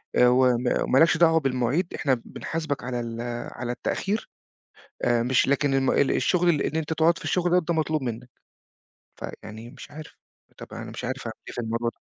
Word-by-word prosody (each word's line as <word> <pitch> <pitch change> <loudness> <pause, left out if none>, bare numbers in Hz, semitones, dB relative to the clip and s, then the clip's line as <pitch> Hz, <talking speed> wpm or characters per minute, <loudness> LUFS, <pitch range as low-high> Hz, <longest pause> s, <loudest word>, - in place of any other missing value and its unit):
آآ، 125 - +6
و 125 +1 +5
وما 125 +1 0
مالكش 160 +5 +4
دعوة 165 -1 +5
بالمواعيد، 135 +5 0
إحنا 130 -5 0
بنحاسبك 155 -3 -4
على 125 -1 -3
ال 115 -1 -4 0.3
على 120 0 -4
التأخير 200 - -2 0.7
آآ، 120 -1 +3
مش 125 +1 +3
لكن 140 0 +2
الم 135 -1 +2
ال 140 - +3
الشغل 180 -1 +2
اللي 155 -4 +2
إن - - -5
أنت 160 0 -1
تقعد 165 +2 +3
في - - -11
الشغل 180 0 +2
ده 170 - 0
مطلوب 155 -2 0
منك، 120 +1 -5 0.9
فيعني 110 +2 -8
مش - - -12
عارف 155 +1 -10 0.4
طَب - - -9
أنا - - -7
مش - - -6
عارف 130 +2 -3
أعمل 110 - -4
إيه - - -7
في - - -3
الموضوع 115 +1 -1
ده. - - -43
135 Hz, 195 wpm, -25 LUFS, 120-160 Hz, 0.9 s, آآ